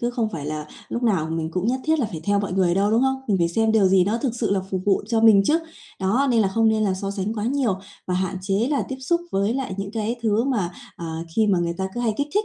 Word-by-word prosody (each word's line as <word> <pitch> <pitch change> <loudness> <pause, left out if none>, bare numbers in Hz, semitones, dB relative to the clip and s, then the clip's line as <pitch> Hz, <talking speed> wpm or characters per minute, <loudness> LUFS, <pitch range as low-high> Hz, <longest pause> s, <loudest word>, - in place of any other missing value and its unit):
cứ 240 - 0
không 240 -3 -1
phải 145 -5 -5
là 150 0 -4 0.2
lúc 240 - -3
nào 195 -10 +2
mình 160 -1 -2
cũng 180 +4 -2
nhất 255 +2 0
thiết 315 0 +2
là 255 - +1
phải 165 -5 -6
theo 205 0 +2
mọi 200 -2 -3
người 180 -2 +2
đâu, 200 +2 +2
đúng 225 +3 +3
không? 265 0 +1
Mình 200 -3 +2
phải 170 -1 +2
xem 220 +5 +1
điều 215 -3 +4
gì 185 -1 +4
nó 215 +4 0
thực 240 -1 -2
sự 235 -2 -1
là 200 -1 +2
phục 190 - -1
vụ 200 -1 +2
cho 225 -1 +2
mình 220 -3 +7
chứ. 310 +9 +3 0.4
Đó, 220 +9 +2
nên 235 -2 +3
là 200 - +3
không 225 +3 +2
nên 220 0 +2
là 195 -2 +1
so 195 +1 -4
sánh 200 +2 -3
quá 210 -1 -3
nhiều 245 -6 0 0.3
và 180 - -1
hạn 185 +1 -1
chế 200 +5 0
là 285 - +1
tiếp 265 - -4
xúc 340 +6 +1
với 200 +4 0
lại 260 -8 -3
những 195 0 -3
cái 225 +1 -2
thứ 220 +1 +2
mà, 220 -10 0 0.3
à, 165 -1 -5 0.2
khi 220 -1 +4
mà 195 -3 +3
người 170 0 -1
ta 190 0 -1
cứ 240 - -3
hay 225 -3 0
kích 285 +1 -1
thích 420 +1 +2
210 Hz, 305 wpm, -23 LUFS, 190-235 Hz, 0.4 s, mình